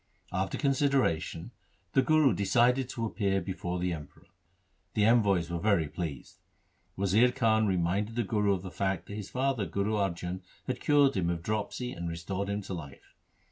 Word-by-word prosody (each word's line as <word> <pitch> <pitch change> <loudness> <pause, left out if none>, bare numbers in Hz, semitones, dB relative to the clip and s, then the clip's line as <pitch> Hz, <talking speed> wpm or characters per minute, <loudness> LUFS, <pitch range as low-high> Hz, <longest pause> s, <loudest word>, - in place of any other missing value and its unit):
After 95 +2 -1
consideration 135 - +1 0.4
the 135 - +5
Guru 155 -3 +4
decided 120 +7 +2
to 115 -2 -3
appear 100 -3 0
before 90 -2 -4
the 90 0 -1
Emperor. 75 -3 -10 0.7
The 105 - +3
envoys 100 -7 +3
were 85 - -2
very 100 -5 +2
pleased. 75 -4 -6 0.6
Wazir 100 +6 +4
Khan 110 -4 +2
reminded 95 +4 0
the 120 - +1
Guru 105 -1 +1
of 95 -1 -3
the 95 - -7
fact 95 -1 -1
that - - -9
his 105 -2 -6
father 130 -6 0
Guru 100 +5 -1
Arjan 90 -2 -2 0.2
had 125 -1 -3
cured 145 -2 +4
him 90 -3 0
of 85 -1 -2
dropsy 110 +5 -2
and 85 -7 -5
restored 95 +4 -4
him 100 0 -2
to 95 - -6
life. 70 -6 -9
100 Hz, 170 wpm, -30 LUFS, 90-120 Hz, 0.7 s, the